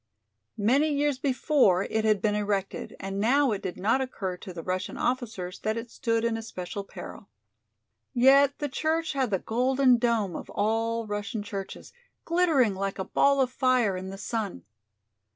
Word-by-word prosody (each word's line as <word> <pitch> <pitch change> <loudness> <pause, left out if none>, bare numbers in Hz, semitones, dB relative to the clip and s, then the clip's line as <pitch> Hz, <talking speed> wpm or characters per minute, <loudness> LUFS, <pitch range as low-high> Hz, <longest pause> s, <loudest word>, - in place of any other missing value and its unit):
Many 265 +9 +3
years 290 -2 0
before 260 - +3
it 220 +1 -1
had 215 -3 +2
been 210 -1 +2
erected, 205 -2 -2
and 195 +1 -4
now 265 +5 +3
it 205 - -2
did 185 - -5
not 225 +7 +2
occur 195 -8 -3
to 185 - -9
the 170 -2 -7
Russian 185 +1 -3
officers 225 -8 -2
that 215 +1 -1
it 230 0 -6
stood 230 -1 0
in 230 -1 0
especial 200 -2 -6
peril. - - -10 0.8
Yet 275 +2 +5
the 295 - -2
church 315 +4 -1
had 265 -3 0
the 195 - +1
golden 255 +4 +2
dome 225 -7 0
of - - -7
all 225 +2 0
Russian 205 0 -4
churches, 200 -2 -7 0.3
glittering 325 - +3
like 195 +1 -3
a 190 - -2
ball 280 -1 +3
of 255 -1 +1
fire 255 -6 +2
in 185 +1 -5
the 195 - -7
sun. 205 - -4
225 Hz, 170 wpm, -27 LUFS, 200-260 Hz, 0.8 s, Yet